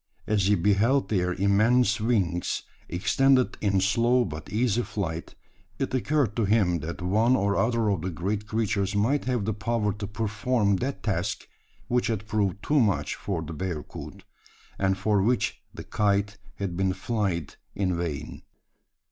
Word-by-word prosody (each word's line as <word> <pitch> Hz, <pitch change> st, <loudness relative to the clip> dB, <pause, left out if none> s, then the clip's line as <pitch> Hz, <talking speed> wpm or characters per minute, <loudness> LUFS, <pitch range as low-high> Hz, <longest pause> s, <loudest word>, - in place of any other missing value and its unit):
As 100 Hz, -2 st, +1 dB
he 105 Hz, -, +4 dB
beheld 105 Hz, +9 st, +2 dB
their 90 Hz, -4 st, +1 dB
immense 110 Hz, +4 st, +3 dB
wings, 95 Hz, -7 st, 0 dB, 0.3 s
extended 125 Hz, +8 st, +2 dB
in 100 Hz, -2 st, +2 dB
slow 120 Hz, +5 st, +3 dB
but 75 Hz, -3 st, -7 dB
easy 115 Hz, +1 st, +1 dB
flight, 85 Hz, -8 st, -4 dB, 0.4 s
it -, -, -2 dB
occurred 130 Hz, -4 st, +1 dB
to 115 Hz, -, +2 dB
him 95 Hz, -5 st, +2 dB
that 85 Hz, +4 st, -6 dB
one 110 Hz, +7 st, +3 dB
or 100 Hz, -4 st, +1 dB
other 115 Hz, -1 st, +1 dB
of 100 Hz, -5 st, +1 dB
the 95 Hz, -, -2 dB
great 100 Hz, +5 st, -3 dB
creatures 105 Hz, -2 st, 0 dB
might 120 Hz, +8 st, +1 dB
have 125 Hz, -5 st, 0 dB
the 110 Hz, -, 0 dB
power 110 Hz, -1 st, -1 dB
to 105 Hz, -1 st, -5 dB
perform 105 Hz, 0 st, 0 dB
that 135 Hz, +7 st, -4 dB
task 95 Hz, -1 st, -2 dB, 0.4 s
which 120 Hz, -3 st, +1 dB
had 110 Hz, -2 st, -2 dB
proved 100 Hz, -2 st, -1 dB
too 150 Hz, 0 st, +3 dB
much 95 Hz, -, +1 dB
for 90 Hz, -5 st, -3 dB
the 80 Hz, +1 st, -7 dB
bearcoot; 80 Hz, -2 st, -6 dB, 0.6 s
and 95 Hz, -1 st, +1 dB
for 105 Hz, +1 st, +2 dB
which 115 Hz, +2 st, 0 dB
the -, -, -8 dB
"kite" 100 Hz, -1 st, 0 dB, 0.2 s
had 95 Hz, -3 st, -3 dB
been 95 Hz, +1 st, +1 dB
"flyed" 95 Hz, -, -2 dB, 0.2 s
in 95 Hz, -2 st, 0 dB
vain. 80 Hz, -3 st, -4 dB
105 Hz, 155 wpm, -26 LUFS, 95-115 Hz, 0.6 s, he